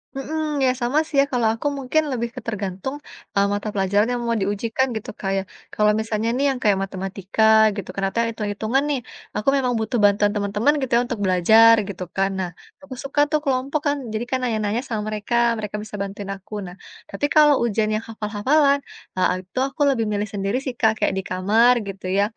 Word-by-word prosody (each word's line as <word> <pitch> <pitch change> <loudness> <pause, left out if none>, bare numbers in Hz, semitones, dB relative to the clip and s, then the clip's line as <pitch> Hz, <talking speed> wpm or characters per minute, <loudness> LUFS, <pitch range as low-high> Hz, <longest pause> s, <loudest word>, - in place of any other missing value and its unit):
Mhm, 300 +2 -3
ya, 255 - +4
sama 245 +5 +2
sih, 310 - -7
ya. - - 0
Kalau 245 -3 +1
aku 230 - -3
mungkin 275 +4 +1
lebih 235 -2 -2
ke 255 - -6
tergantung, 200 +3 -4 0.4
eee, 200 0 +3
mata 205 +1 -3
pelajaran 200 +2 +2
yang 245 - -1
mau 230 - +1
diujikan 220 +5 0
gitu, 220 - -5
Kak, 195 - -2
ya. 195 - -1 0.3
Kalau 210 0 +3
misalnya 220 0 -1
nih 275 +3 +1
yang 260 - -4
kayak 205 -2 +4
matematika 195 +2 -3 0.3
gitu, 200 -3 -6
ternyata 195 +3 -1
hitung-hitungan 220 +4 -1
nih, 280 - 0 0.4
aku 210 +5 +1
memang 260 -2 +1
butuh 220 +2 -1
bantuan 205 0 +4
teman-teman 210 +7 +1
gitu, 260 - -4
ya, - - +2
untuk 240 -3 -4
belajar 220 +5 +6
gitu, 185 -3 -6
kan, 195 0 +2
nah, 180 -2 -3 0.3
aku 275 - -9
suka 275 +1 -3
tuh 305 - +3
kelompok 270 +2 0
kan, 285 0 +1 0.2
jadi 220 +2 -2
kan 260 - +2
nanya-nanya 220 -1 0
sama 220 -3 -2
mereka, 215 +2 -3 0.2
mereka 210 -2 -5
bisa 215 -1 -9
bantuin 200 0 -5
aku. 195 +2 -15
Nah, 180 - -10 0.3
tapi 200 +8 -2
kalau 300 -1 +7
ujian 220 -2 +1
yang 215 - -3
hafal-hafalan, 245 +7 +1 0.4
eee, 185 - +3
itu 220 - -4
aku 285 +3 -9
lebih 235 -5 +1
milih 205 0 -1
sendiri 200 +3 -1
sih, 260 -3 -3
Kak, 220 -2 +4
kayak - - +1
di 190 - -2
kamar 210 +7 +4
gitu 195 -1 -8
ya, 200 - +4
220 Hz, 200 wpm, -22 LUFS, 200-255 Hz, 0.4 s, kalau